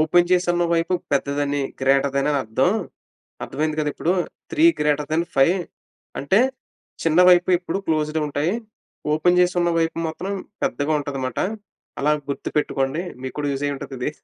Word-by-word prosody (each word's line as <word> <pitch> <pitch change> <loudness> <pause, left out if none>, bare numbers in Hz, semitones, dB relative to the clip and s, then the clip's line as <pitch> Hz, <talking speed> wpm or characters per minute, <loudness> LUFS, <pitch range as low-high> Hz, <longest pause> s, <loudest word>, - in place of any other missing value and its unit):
Open 175 +3 +3
చేసివున్న, 175 -1 +2
వైపు 170 +2 +1 0.2
పెద్దదని 140 +1 0 0.2
greater 135 +1 +3
than 140 +1 +1
అని 145 - +2
అర్థం 130 - +1 0.7
అర్థమైంది 155 +1 -2
కదా! 150 -1 0
ఇప్పుడు. 175 - 0 0.4
3 310 - +3 0.2
గ్రేటర్ 150 -1 +1
దెన్ 165 +2 +2
5 150 +7 +5 0.6
అంటే, 190 +10 +3 0.6
చిన్న 165 +1 +4
వైపు 180 0 +5
ఎప్పుడు 175 +1 -3
క్లోస్డ్ 155 0 0
ఉంటాయి. 150 +6 -1 0.6
ఓపెన్ 175 +3 +3
చేసివున్న 175 -1 +2
వైపు 165 0 0
మాత్రం 180 +5 -5 0.3
పెద్దగా 145 +2 0
ఉంటది 145 -1 -4
మాట, 130 - -5 0.6
అలా 150 - +2 0.2
గుర్తుపెట్టుకోండి" 140 0 -1 0.2
మీకు 130 - -5
కూడా 145 -1 -1
యూజ్ 135 +1 -4
అయ్యి 145 - -1
ఉంటది 135 - -8
ఇది. 125 - -1
150 Hz, 150 wpm, -22 LUFS, 140-175 Hz, 0.7 s, 5